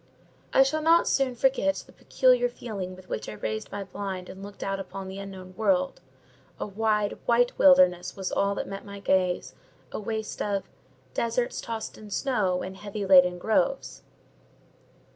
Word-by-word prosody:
I 270 - +7
shall 310 +4 0
not 330 +2 +5
soon 265 -2 +1
forget 270 +3 +2
the - - -17
peculiar - - +3
feeling 195 - -6
with 185 0 -15
which 110 - -4
I - - -6
raised 110 +1 -4
my 205 - -4
blind 190 -1 -5
and 190 - -9
looked 200 0 -8
out 195 0 -2
upon 195 0 -7
the 190 +1 -7
unknown 190 -2 -9
world: 275 +6 +1 0.6
a - - -2
wide, 210 0 0
white 240 +1 +3
wilderness 185 -11 +5
was 190 -1 -4
all 200 0 +1
that - - -3
met 195 0 -6
my 200 -1 -9
gaze; 185 -2 +1 0.4
a - - -4
waste 220 0 -4
of 200 -2 0 0.5
Deserts 235 +1 -1
tossed 225 -1 -5
in 215 -1 -11
snow, 200 -6 0
And 190 +1 -7
heavy 205 0 -5
laden 180 -2 +6
groves. - - 0
200 Hz, 165 wpm, -27 LUFS, 190-245 Hz, 0.6 s, I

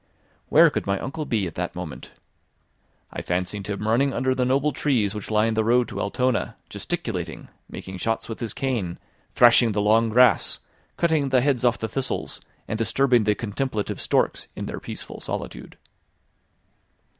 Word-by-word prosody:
Where - - +7
could - - -3
my 100 0 +1
uncle 150 +4 -4
be 110 -7 0
at 85 - -5
that 90 +1 -4
moment? 80 -8 -7 1.0
I - - -4
fancied 90 +2 -3
him 105 +1 -3
running 130 +5 +2
under 130 0 +1
the 130 -1 0
noble 135 +4 +2
trees 120 -9 +1
which 105 -2 -6
line 110 +1 +2
the 110 0 +1
road 120 +2 +3
to 100 -2 -4
Altona, 125 +4 -1
gesticulating, - - -4 0.2
making 95 -1 -8
shots 115 +3 -1
with 115 - -6
his 115 -3 -3
cane, 115 -11 -2 0.4
thrashing 120 -2 +6
the 105 - 0
long 110 +2 +3
grass, 125 +3 +4 0.4
cutting 160 -5 +2
the 130 -1 +4
heads 135 -3 +1
off 120 -1 +3
the 110 - -3
thistles, 130 +4 -3 0.3
and 110 - -3
disturbing 120 0 +3
the 105 0 +3
contemplative 110 0 -3
storks - - 0
in - - -5
their - - -5
peaceful - - -8
solitude. - - -6
115 Hz, 165 wpm, -24 LUFS, 105-130 Hz, 1.0 s, Where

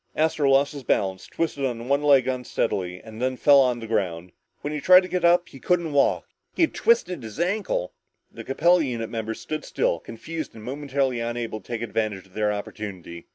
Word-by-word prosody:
Astro 155 -2 +2
lost 135 +2 +3
his 140 - -7
balance, 95 -6 -1
twisted 150 -4 -2
on 120 -2 -2
one 140 +1 +2
leg 140 -4 +4
unsteadily, 110 -8 -2
and 110 +1 -10
then 130 0 0
fell 135 -1 +6
to 120 - -5
the 115 - -7
ground. 90 -6 -2 0.3
When 145 - -4
he 150 - -3
tried 185 +3 +8
to - - -5
get 180 0 -2
up, 175 +1 +4
he 135 - -13
couldn't 170 -2 0
walk. 140 - +2 0.3
He - - +3
had 325 - +1
twisted 180 - +2
his 110 +4 -9
ankle. 180 - -1 0.4
The - - -9
Capella 170 +5 +3
unit 115 -5 -3
members 110 -1 -4
stood 155 -1 -4
still, 85 - 0
confused 155 - -7
and 110 - -11
momentarily 135 -1 -1
unable 115 -2 -3
to - - -24
take 115 -1 -3
advantage 110 -3 -2
of 95 - -23
their 105 0 0
opportunity. 100 -5 -7
130 Hz, 200 wpm, -24 LUFS, 110-150 Hz, 0.4 s, tried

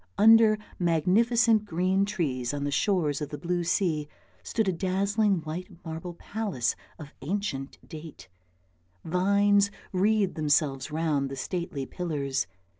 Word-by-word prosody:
Under 220 +1 +7 0.2
magnificent 215 +7 +3
green 185 +2 +1
trees 145 - -2
on 140 - -3
the 145 - -1
shores 155 -3 +1
of 150 - -3
the 150 - -6
blue 175 +1 -1
sea 165 -4 0 0.3
stood 220 -3 -1
a - - +3
dazzling 195 +2 +1
white 160 +5 -6 0.2
marble 165 +2 -6
palace 200 - -2 0.2
of 150 -2 -11
ancient 140 -4 -3
date; 155 - -10 0.8
vines 200 +3 +3 0.2
wreathed 200 +1 +2
themselves 150 -2 +1
round 150 -3 0
the 135 - -5
stately 155 -1 -4
pillars. 140 -7 -2
175 Hz, 125 wpm, -27 LUFS, 150-200 Hz, 0.8 s, Under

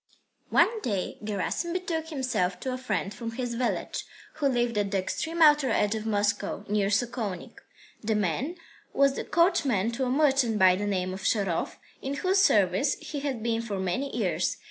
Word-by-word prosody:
II - - -38
One 455 -2 +4
day 200 - -2
Gerasim 210 - -2
betook 335 -3 -2
himself 240 - -1
to 260 -1 -2
a - - -3
friend 210 -5 -2
from 230 +2 -6
his 245 0 -3
village, 240 +1 -2 0.3
who 295 -3 +2
lived 240 -3 +1
at 200 -1 0
the 195 - 0
extreme 320 - 0
outer 295 -3 +6
edge 210 0 +2
of 220 0 -4
Moscow, 205 -1 -1
near 205 -1 +1
Sokolnik. 210 -3 -2 0.4
The 220 0 +1
man 210 - -1 0.4
was 275 0 +3
coachman 270 - +2
to 255 +3 -2
a - - -1
merchant 270 -5 +3
by 185 -2 +6
the 205 +2 -2
name 185 -2 -1
of 190 - -7
Sharov, 195 -6 0 0.3
in 275 +1 -3
whose 375 +6 +2
service - - +3
he 295 - -6
had 270 -6 -3
been 230 -1 0
for 210 -4 -4
many 190 +10 -2
years. 180 -5 0
230 Hz, 180 wpm, -27 LUFS, 200-275 Hz, 0.4 s, outer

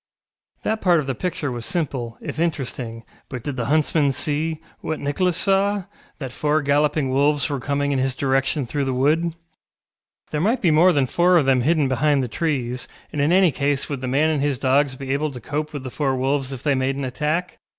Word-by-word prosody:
That 220 0 -1
part 175 -3 +4
of 150 - -2
the 135 - -1
picture 150 -2 -3
was 120 -1 -5
simple, 130 -7 -3
if - - -6
interesting, 130 -8 -3 0.3
but 125 -3 -6
did 145 - -3
the 120 -3 -2
huntsman 150 0 +2
see, 155 +3 -1 0.2
what 155 - -3
Nicholas 165 +5 0
saw, 200 0 +2 0.3
that 135 -4 -6
four 150 +3 0
galloping 145 -1 +2
wolves 140 +1 +2
were 140 - -1
coming 145 +2 -1
in 135 - +1
his 130 0 0
direction 135 +1 0
through 140 +3 -2
the 130 -1 -1
wood? 160 +5 +1 1.0
There 150 - -1
might 225 +8 +2
be 175 - +3
more 170 +4 +6
than 140 -5 +2
four 175 +6 +3
of 155 - +3
them 130 -2 +3
hidden 150 +1 +2
behind 140 +1 +2
the - - -2
trees, 125 -3 -2 0.3
and 150 - -1
in 145 +3 +2
any 185 -2 +5
case 140 0 -1
would 140 -3 -4
the 130 - -3
man 145 +5 +2
and 150 -3 0
his 140 -2 0
dogs 135 +1 +2
be 135 0 -3
able 150 +2 0
to 130 -3 -8
cope 150 +4 -3
with 145 -3 -6
the 130 - -6
four 135 -2 0
wolves 135 +1 0
if 130 -3 -7
they 145 - +2
made 130 0 0
an 140 -1 -3
attack? 150 +7 -2
145 Hz, 215 wpm, -22 LUFS, 130-155 Hz, 1.0 s, more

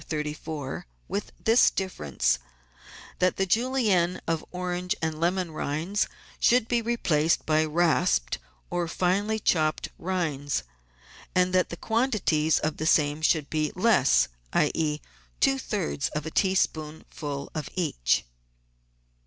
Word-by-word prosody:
134, 150 - -5 0.2
with 205 +1 -3
this 225 +3 +5
difference: 75 - -1 0.8
that 185 0 +2
the 195 - +2
Julienne 205 -5 +2
of 165 -1 0
orange 180 0 -2
and 160 -1 -2
lemon 175 0 0
rinds 160 +7 -1 0.3
should 240 -2 +4
be 240 -1 +1
replaced 170 -9 +1
by 155 0 +3
rasped 165 - +2 0.3
or 175 -1 0
finely 195 +6 +1
chopped 155 -7 +1
rinds, 150 - -1 0.7
and 180 0 +3
that 185 0 +3
the 170 - -6
quantities 210 - +1
of 155 0 -2
same 150 0 +3
should 155 -2 +2
be 155 -1 -1
less, 185 - +4 0.3
i.e., 150 -2 +1 0.4
two 270 0 +3
thirds 195 - -2
of 150 0 -2
a 160 - -4
tea 190 +2 +2
spoonful 150 -3 -3
of 155 -3 -4
each. 60 - +1
170 Hz, 120 wpm, -27 LUFS, 155-190 Hz, 0.8 s, this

